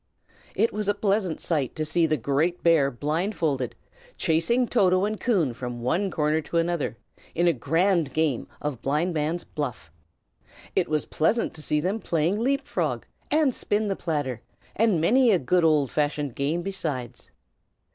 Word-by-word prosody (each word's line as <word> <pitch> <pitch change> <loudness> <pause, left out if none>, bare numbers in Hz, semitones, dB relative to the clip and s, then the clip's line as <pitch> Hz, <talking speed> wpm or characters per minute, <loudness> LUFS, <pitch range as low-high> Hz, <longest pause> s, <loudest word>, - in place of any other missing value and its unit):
It 230 - +2
was 210 -1 -2
a 205 - +2
pleasant 200 -4 0
sight 145 -7 -1
to 155 - -2
see 165 +2 +2
the 155 0 +1
great 145 +8 0
bear 160 -5 +4
blindfolded, 150 - -1 0.4
chasing 195 +10 +2
Toto 185 -5 +3
and 215 0 -3
Coon 180 - +1
from 120 -1 -6
one 185 +10 +1
corner 155 -1 +1
to 170 - -3
another, 165 -7 0 0.4
in 170 - +2
a 170 - +4
grand 165 +3 +1
game 150 -3 0
of 145 -5 -4
blindman's 155 +3 -1
buff; 125 - -5 0.8
it - - +1
was 155 -1 0
pleasant 215 +9 0
to 155 - -8
see 150 0 +1
them 190 +8 -1
playing 170 +2 0
leap 275 +4 0
frog, - - -2 0.2
and 300 -3 +3
spin 210 -1 -1
the 195 - 0
platter, 145 -10 -3 0.3
and 215 -6 +3
many 245 +10 +4
a 200 - +5
good 175 +4 +1
old 150 -4 +3
fashioned 145 -2 -1
game 150 +7 -1
besides. 150 -11 -4
165 Hz, 160 wpm, -25 LUFS, 145-195 Hz, 0.8 s, a